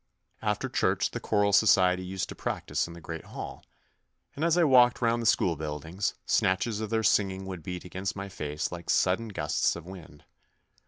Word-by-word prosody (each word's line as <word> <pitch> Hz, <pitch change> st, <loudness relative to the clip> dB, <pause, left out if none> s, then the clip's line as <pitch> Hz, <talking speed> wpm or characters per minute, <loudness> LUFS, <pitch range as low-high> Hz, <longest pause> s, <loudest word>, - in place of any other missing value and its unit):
After -, -, -1 dB
church -, -, +1 dB
the -, -, -4 dB
choral 105 Hz, -1 st, +1 dB
society 95 Hz, -4 st, +4 dB
used 95 Hz, +1 st, -3 dB
to -, -, -5 dB
prac -, -, -4 dB
tise -, -, -1 dB
in 85 Hz, -, -10 dB
the 85 Hz, -, -11 dB
Great 80 Hz, 0 st, -6 dB
Hall, -, -, -8 dB, 0.7 s
and 145 Hz, -, -3 dB
as 170 Hz, 0 st, +3 dB
I 175 Hz, -, +5 dB
walked 125 Hz, -5 st, +5 dB
round 115 Hz, 0 st, +1 dB
the 115 Hz, -, 0 dB
school 90 Hz, -5 st, +3 dB
buildings, 80 Hz, +5 st, -3 dB
snatches 100 Hz, +4 st, +1 dB
of 110 Hz, -, -3 dB
their 110 Hz, 0 st, 0 dB
singing 95 Hz, -3 st, +2 dB
would 95 Hz, -3 st, -6 dB
beat 90 Hz, +2 st, -6 dB
against 95 Hz, +1 st, -4 dB
my 100 Hz, 0 st, -5 dB
face 75 Hz, -5 st, -4 dB
like 85 Hz, -1 st, -8 dB
sudden 95 Hz, +5 st, +2 dB
gusts 80 Hz, -8 st, 0 dB
of 85 Hz, -1 st, -9 dB
wind. 85 Hz, -5 st, -12 dB
95 Hz, 195 wpm, -28 LUFS, 85-110 Hz, 0.7 s, I